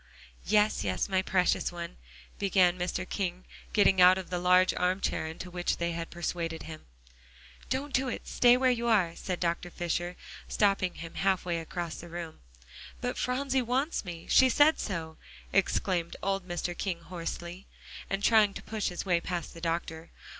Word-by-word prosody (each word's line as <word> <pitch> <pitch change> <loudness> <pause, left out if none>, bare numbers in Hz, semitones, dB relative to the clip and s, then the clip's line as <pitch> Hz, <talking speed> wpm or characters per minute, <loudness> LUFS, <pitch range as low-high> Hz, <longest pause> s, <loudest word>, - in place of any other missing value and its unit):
"Yes, 210 - +3
yes, 95 -2 -1
my 190 -1 +2
precious 185 -1 +1
one," 170 -1 -7 0.4
began 185 -3 +3
Mr. 180 +1 -2
King, 185 -2 -3 0.3
getting 195 -3 +4
out 180 +1 +8
of 185 -1 -7
the 180 - -1
large 180 +1 +4
arm 180 +1 +1
chair 160 - -1
into 165 +3 -7
which 175 0 -1
they 170 0 -1
had 165 0 -4
persuaded 170 -1 -3
him. 160 -1 -10 0.8
"Don't 275 +1 -2
do 265 +1 +2
it. 245 - -5
Stay 245 0 +5
where 255 0 +3
you 235 -1 -1
are," 190 -7 +3
said 180 -2 -4
Dr. 170 0 -1
Fisher, 175 +1 -2 0.3
stopping 195 -3 +1
him 165 -1 -8
half 190 -1 +1
way 170 -2 -1
across 170 0 -5
the 175 - -10
room. 170 -1 -7 0.6
"But - - -2
Phronsie 265 +1 0
wants 260 +6 -1
me; 170 -3 -8
she 260 -1 +6
said 295 +5 +5
so," 160 -5 -4 0.4
exclaimed 185 -3 +1
old 195 -1 -1
Mr. 175 0 -3
King 175 -3 -3
hoarsely, 175 +1 -6 0.4
and 195 +1 -2
trying 215 -3 +5
to - - -7
push 215 -1 -2
his 175 +1 -4
way 175 -3 +2
past 175 -2 -4
the 165 - -11
doctor. 165 -1 -3
180 Hz, 175 wpm, -29 LUFS, 170-200 Hz, 0.8 s, out